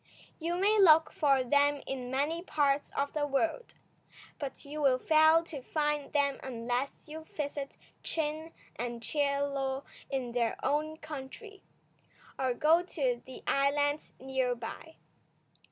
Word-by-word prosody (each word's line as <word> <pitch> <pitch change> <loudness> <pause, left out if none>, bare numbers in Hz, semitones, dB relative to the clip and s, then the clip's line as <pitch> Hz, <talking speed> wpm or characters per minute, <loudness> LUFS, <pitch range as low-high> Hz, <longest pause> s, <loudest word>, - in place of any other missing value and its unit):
You 340 +1 -1
may 410 +4 +3
look 320 -4 +7
for 275 -3 +3
them 285 +2 +2
in 255 -2 -4
many 290 +6 0
parts 290 -5 +1
of 280 0 0
the 295 -1 0
world, 320 - -1 0.6
but 280 -1 -6
you 300 +2 -5
will 265 -3 +4
fail 315 +3 +5
to 310 -5 -7
find 295 +1 -1
them 280 -2 +1
unless 245 +3 -3
you 315 +1 -8
visit 285 -2 -4 0.2
Chin 315 0 -3 0.3
and 235 0 -4
Chie 280 +1 +1
Lo 275 -1 -1 0.3
in 260 -3 -2
their 235 -1 0
own 310 +2 0
country, 310 - -9 0.8
or 260 -2 +1
go 320 +6 +4
to 265 -9 -1
the 260 - -10
islands 290 +1 +1
near 260 -1 0
by. 240 +7 -8
285 Hz, 135 wpm, -31 LUFS, 265-310 Hz, 0.8 s, look